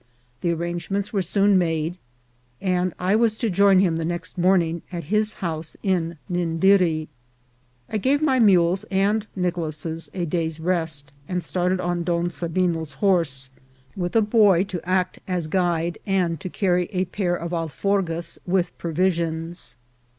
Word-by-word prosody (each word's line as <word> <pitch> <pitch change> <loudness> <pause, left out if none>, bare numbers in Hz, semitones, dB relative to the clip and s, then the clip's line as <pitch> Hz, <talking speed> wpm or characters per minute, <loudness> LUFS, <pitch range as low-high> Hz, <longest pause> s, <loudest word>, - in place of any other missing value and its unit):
The 175 - 0
arrangements 175 +5 -3
were 200 - +2
soon 195 +2 +3
made, 165 -1 -1 0.6
and 185 -1 0
I 185 +3 +1
was 225 -1 +3
to 225 -1 -1
join 195 0 +5
him 170 -4 +2
the 165 - -2
next 170 +1 -4
morning 175 -2 +2
at 170 -2 -4
his 215 0 +2
house 160 -1 -4
in 170 -4 0
Nindiri. 175 -2 +2 0.8
I 220 - -2
gave 270 +7 +2
my 275 -4 +2
mules 185 -3 +4
and 205 +2 +1
Nicolas 165 -3 -2
a 180 -2 -1
day's 160 -1 -2
rest, 160 -5 -1
and 180 -1 -2
started 180 0 0
on 175 -1 -1
Don 170 0 0
Sabino's 165 -3 -1
horse, 140 -6 0 0.4
with 175 0 -3
a 225 - +5
boy 205 -4 +4
to 180 -3 -6
act 185 -1 0
as 180 -3 -1
guide 170 0 0
and 180 -4 +1
to 190 - -5
carry 180 -2 +1
a 185 +1 -1
pair 180 -1 -1
of 170 0 -5
alforgas 170 +1 -1
with 180 -1 0
provisions. 170 -3 -1
175 Hz, 150 wpm, -23 LUFS, 165-190 Hz, 0.8 s, join